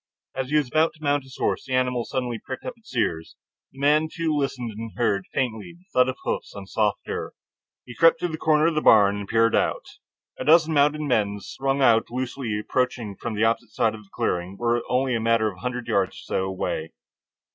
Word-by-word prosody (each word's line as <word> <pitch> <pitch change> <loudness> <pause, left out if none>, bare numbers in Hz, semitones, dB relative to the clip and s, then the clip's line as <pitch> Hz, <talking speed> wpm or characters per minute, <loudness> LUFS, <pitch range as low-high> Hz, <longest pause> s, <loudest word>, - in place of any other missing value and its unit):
As 130 -1 -3
he 150 - 0
was 150 -3 +3
about 155 +5 +2
to 155 - -17
mount 145 0 +2
his 130 -1 -14
horse, - - -1
the 130 - -1
animal 125 -2 +1
suddenly 120 -3 -3
pricked 130 - -7
up 255 - -4
its 220 - -11
ears. 80 -7 -1 0.4
The - - -21
man, 150 +3 +3
too, 165 -3 -1
listened, 135 -5 -2
and 110 +1 -7
heard, 100 -5 +1
faintly, 125 +5 -3
the 175 - -25
thud 125 0 +4
of 130 - -4
hoofs - - -3
on 100 -1 -7
soft 105 +1 0
earth. - - -4 0.5
He 120 - -9
crept 165 +5 +5
to 175 - +1
the 160 - -4
corner 155 -1 +3
of 165 - +3
the 155 - 0
barn 100 -5 +6
and 100 -1 -5
peered 115 +1 +3
out. - - 0 0.5
A - - -2
dozen 160 +1 +5
mounted 150 +1 +3
men, 110 -8 +1
strung 135 +5 -1
out 115 -3 +4
loosely, 125 -3 -3
approaching 120 -2 -1
from 115 +2 -5
the 105 - +1
opposite 115 -1 0
side 110 +1 +1
of 110 - -9
the - - -27
clearing, 90 +2 -2
were 120 +1 +1
only 130 0 +1
a 115 - +1
matter 115 -1 +2
of 90 - -15
a - - -15
hundred 125 -1 -3
yards 95 -2 +1
or - - -11
so 95 - -1
away. 90 -4 -3
125 Hz, 225 wpm, -24 LUFS, 110-145 Hz, 0.5 s, barn